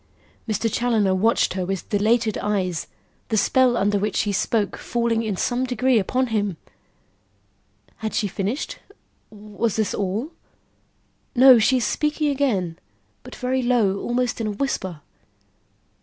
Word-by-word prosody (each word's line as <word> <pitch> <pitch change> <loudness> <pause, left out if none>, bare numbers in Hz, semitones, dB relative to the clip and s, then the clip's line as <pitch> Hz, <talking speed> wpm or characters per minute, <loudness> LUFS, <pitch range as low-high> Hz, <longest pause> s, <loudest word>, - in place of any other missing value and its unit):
Mr. 215 +2 0
Challoner 225 -5 +2
watched 215 +3 +2
her 185 -1 -2
with 190 0 -4
dilated 215 +1 +2
eyes, 185 -6 -1 0.4
the 220 - +1
spell 250 +3 +3
under 205 +1 +1
which 210 +2 -2
she 205 - +1
spoke 205 +1 0
falling 235 -1 -1
in 215 -4 -3
some 245 +5 0
degree 255 -1 +2
upon 255 +6 0
him. 205 -5 -1 1.4
Had 220 -1 -4
she 215 -4 +1
finished? 200 - -3 0.5
Was 210 +1 -3
this 220 -2 0
all? 205 - -2 1.0
No; 255 -1 +8
she 255 +4 +3
is 245 - 0
speaking 300 0 0
again, 205 -12 -1 0.4
but - - -11
very 255 +1 -1
low, 230 -6 +2
almost 245 -1 -1
in 220 - -1
a - - -1
whisper. 190 - -3
220 Hz, 140 wpm, -23 LUFS, 200-245 Hz, 1.4 s, No